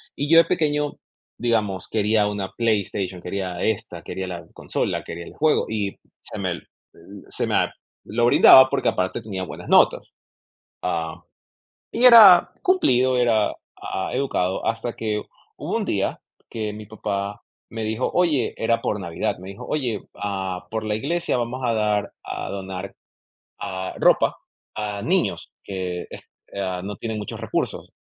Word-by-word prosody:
Y 145 Hz, +1 st, -2 dB
yo, 165 Hz, -, +8 dB
de 165 Hz, -, +8 dB
pequeño, 150 Hz, -2 st, 0 dB, 0.4 s
digamos, 105 Hz, -6 st, 0 dB
quería 105 Hz, -1 st, +2 dB
una 100 Hz, -2 st, -3 dB
PlayStation, 100 Hz, -5 st, -1 dB
quería 90 Hz, -1 st, -4 dB
esta, 110 Hz, -2 st, -2 dB
quería 95 Hz, 0 st, -5 dB
la 90 Hz, -2 st, -6 dB
consola, -, -, -2 dB
quería 85 Hz, +1 st, -7 dB
el -, -, -11 dB
juego 155 Hz, 0 st, +2 dB
y 105 Hz, -3 st, -2 dB, 0.3 s
se -, -, -8 dB
me, -, -, -1 dB
eh, -, -, -7 dB, 0.7 s
se -, -, -2 dB
me -, -, 0 dB, 0.5 s
lo 120 Hz, +3 st, +1 dB
brindaba 130 Hz, +2 st, +8 dB
porque, -, -, +1 dB
aparte, 95 Hz, +5 st, -1 dB
tenía 100 Hz, -4 st, -5 dB
buenas -, -, -8 dB
notas, -, -, +4 dB, 0.7 s
ah, 85 Hz, -2 st, -2 dB, 0.7 s
y 245 Hz, -, +2 dB
era 215 Hz, -8 st, +9 dB
cumplido, 130 Hz, -, +3 dB
era, 115 Hz, -4 st, +3 dB, 0.3 s
ah, 95 Hz, -, -3 dB
educado, 110 Hz, -9 st, -1 dB
hasta 115 Hz, +1 st, -1 dB
que 105 Hz, -2 st, -2 dB, 0.4 s
hubo -, -, -3 dB
un -, -, -2 dB
día -, -, -1 dB, 0.3 s
que 110 Hz, -2 st, -3 dB
mi 105 Hz, 0 st, -9 dB
papá 100 Hz, -1 st, -4 dB, 0.3 s
me 115 Hz, -1 st, -5 dB
dijo: 110 Hz, +3 st, -1 dB
"Oye", 155 Hz, -9 st, +2 dB
era 115 Hz, 0 st, +1 dB
por 105 Hz, -, -1 dB
Navidad, 85 Hz, -3 st, -2 dB
me 95 Hz, +1 st, -9 dB
dijo: 100 Hz, -, -9 dB
"Oye, 125 Hz, -8 st, -1 dB
ah, 95 Hz, -3 st, -4 dB
por 110 Hz, 0 st, -2 dB
la 105 Hz, 0 st, 0 dB
iglesia 170 Hz, +6 st, -1 dB
vamos 120 Hz, +2 st, -3 dB
a 115 Hz, -, +2 dB
dar, 105 Hz, -2 st, 0 dB
a -, -, -5 dB
donar, 95 Hz, 0 st, -6 dB, 0.7 s
ah, 95 Hz, 0 st, -4 dB
ropa -, -, +4 dB, 0.4 s
a 105 Hz, -1 st, -4 dB
niños -, -, 0 dB
que 90 Hz, -2 st, -4 dB
es -, -, -8 dB, 0.4 s
ah, 95 Hz, -2 st, -2 dB
no 100 Hz, +1 st, -5 dB
tienen 110 Hz, +2 st, -4 dB
muchos 105 Hz, -, -6 dB
recursos". -, -, -3 dB
105 Hz, 155 wpm, -23 LUFS, 95-120 Hz, 0.7 s, era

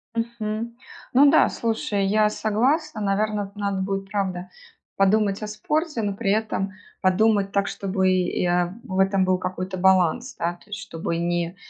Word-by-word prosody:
Мгм. 230 Hz, 0 st, -3 dB, 0.4 s
Ну 280 Hz, +3 st, +7 dB
да, 315 Hz, -, +6 dB
слушай, 220 Hz, -3 st, -1 dB
я 210 Hz, +2 st, +3 dB
согласна. 245 Hz, +7 st, 0 dB
Наверно, 205 Hz, 0 st, 0 dB
надо 200 Hz, -2 st, -2 dB
будет 195 Hz, 0 st, -3 dB
правда 185 Hz, -3 st, -2 dB, 0.5 s
подумать 200 Hz, +1 st, +2 dB
о 215 Hz, -, -4 dB
спорте, 295 Hz, +6 st, -2 dB
но 205 Hz, -1 st, -1 dB
при 195 Hz, -1 st, 0 dB
этом 210 Hz, -2 st, -1 dB, 0.3 s
подумать 200 Hz, +1 st, +3 dB
так, 200 Hz, 0 st, +1 dB
чтобы 190 Hz, -1 st, -1 dB
я 180 Hz, 0 st, +1 dB
в 190 Hz, -6 st, -3 dB
этом 190 Hz, 0 st, +3 dB
был 185 Hz, 0 st, +2 dB
какой-то 185 Hz, +1 st, -4 dB
баланс, 190 Hz, -, +2 dB
да? 170 Hz, +1 st, -1 dB
То 190 Hz, -, -23 dB
есть 205 Hz, -1 st, -5 dB
чтобы 165 Hz, -3 st, -4 dB
не 170 Hz, +1 st, -1 dB
200 Hz, 155 wpm, -24 LUFS, 185-215 Hz, 0.5 s, Ну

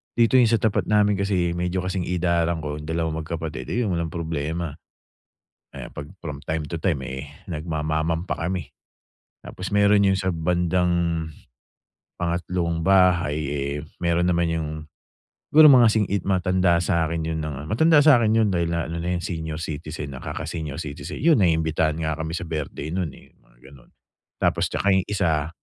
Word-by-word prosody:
Dito 120 Hz, +2 st, +4 dB
yung 120 Hz, -, +5 dB
sa 115 Hz, -, +4 dB
tapat 110 Hz, -2 st, 0 dB
namin 105 Hz, -2 st, +3 dB
kasi, 95 Hz, -3 st, +1 dB
eh, -, -, -2 dB
medyo 90 Hz, +1 st, -1 dB
kasing 95 Hz, -1 st, -2 dB
idaran 85 Hz, -1 st, +1 dB
ko 75 Hz, 0 st, -4 dB
'yung 75 Hz, -, -9 dB
dalawang 80 Hz, -1 st, -1 dB
magkapatid, 80 Hz, -5 st, -5 dB
ayun 120 Hz, -5 st, 0 dB
walang 85 Hz, -1 st, -1 dB
problema. 80 Hz, 0 st, -3 dB, 1.0 s
Eh, -, -, -7 dB
'pag 70 Hz, -, -8 dB, 0.2 s
from 75 Hz, -4 st, -5 dB
time 80 Hz, -1 st, -2 dB
to 85 Hz, -, -3 dB
time, 85 Hz, -7 st, +1 dB
eh, 65 Hz, +2 st, -6 dB, 0.2 s
nagmamamam 80 Hz, +1 st, -2 dB
pa 85 Hz, -, -3 dB
kami. 90 Hz, -3 st, -3 dB, 0.7 s
Tapos 95 Hz, -, -7 dB
meron 100 Hz, 0 st, +4 dB
'yung 95 Hz, -1 st, +2 dB
sa 95 Hz, -1 st, 0 dB
bandang, 85 Hz, -1 st, 0 dB, 0.9 s
pangatlong 85 Hz, -1 st, -1 dB
bahay, 90 Hz, -6 st, +4 dB
eh, 70 Hz, 0 st, -2 dB, 0.2 s
meron 85 Hz, 0 st, +2 dB
naman 85 Hz, -1 st, +1 dB
'yung 80 Hz, -1 st, -2 dB, 0.9 s
siguro 155 Hz, +1 st, +9 dB
mga 120 Hz, -3 st, +7 dB
sing 105 Hz, -1 st, +2 dB
id 100 Hz, -1 st, 0 dB
matanda 90 Hz, -2 st, +2 dB
sa'kin 85 Hz, -3 st, 0 dB
'yun 80 Hz, 0 st, -2 dB
ng 75 Hz, -2 st, -5 dB
matanda 160 Hz, +7 st, +4 dB
sa'kin 125 Hz, -7 st, +5 dB
'yun 110 Hz, -2 st, +3 dB
dahil, 85 Hz, -1 st, 0 dB
ah, 85 Hz, -, -1 dB
ano 85 Hz, -, -4 dB
na 85 Hz, -, -2 dB
'yun -, -, -5 dB
senior 80 Hz, -2 st, -4 dB
citizen 75 Hz, -2 st, -5 dB
na, -, -, -10 dB
kaka-senior 80 Hz, -4 st, -5 dB
citizen. 75 Hz, -3 st, -7 dB
'Yun, 160 Hz, 0 st, +5 dB
naimbitahan 80 Hz, -2 st, +1 dB
nga 80 Hz, 0 st, -1 dB
kami 80 Hz, 0 st, -4 dB
sa 90 Hz, -, -5 dB
birthday 75 Hz, -1 st, -4 dB
nun, 90 Hz, -3 st, -1 dB
eh, -, -, -19 dB
mga -, -, -29 dB
gano'n. 65 Hz, -3 st, -17 dB, 0.5 s
Tapos, -, -, +2 dB
tsaka 100 Hz, -, 0 dB
'yung 95 Hz, -1 st, +2 dB
isa, 80 Hz, -7 st, 0 dB
85 Hz, 170 wpm, -24 LUFS, 80-95 Hz, 1.0 s, siguro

